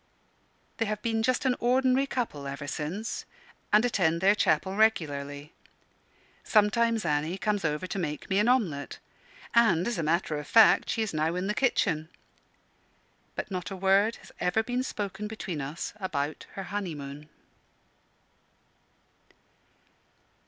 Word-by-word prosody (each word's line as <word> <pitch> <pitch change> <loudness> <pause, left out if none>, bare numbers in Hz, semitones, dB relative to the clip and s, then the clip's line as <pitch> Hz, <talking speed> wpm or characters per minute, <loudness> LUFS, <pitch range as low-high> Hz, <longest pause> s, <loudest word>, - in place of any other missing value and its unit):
They 225 - 0
have 210 0 -3
been 225 -1 0
just 255 +3 +1
an 255 -1 +3
ordinary 255 +2 +3
couple 215 - -3
ever 140 +1 -5
since, 160 +10 -4 0.5
and 215 +3 +5
attend 170 -8 +1
their 195 +3 +5
chapel 190 -1 +1
regularly. 145 -9 0 0.9
Sometimes 225 0 +2
Annie 155 +3 0
comes 205 -1 -1
over 150 +2 -1
to 190 +2 -4
make 150 -4 -4
me 195 +1 +2
an 210 - +3
omelet; 190 - 0 0.6
and, 205 -8 +4
as 240 -6 -2
a - - +1
matter 155 -1 0
of 150 - -8
fact, 225 -1 +6
she 225 - 0
is 215 - -4
now 155 +2 0
in 180 +1 -2
the 210 - 0
kitchen. 165 - +1 1.3
But - - -5
not 180 -2 -3
a 195 - -5
word 195 +4 +3
has - - -15
ever 180 +5 +1
been 245 +2 -1
spoken 210 -4 -4
between 190 -7 -5
us 145 +5 -5
about 155 -7 -3
her 195 - -5
honeymoon. 150 -7 -6
190 Hz, 140 wpm, -28 LUFS, 155-220 Hz, 1.3 s, fact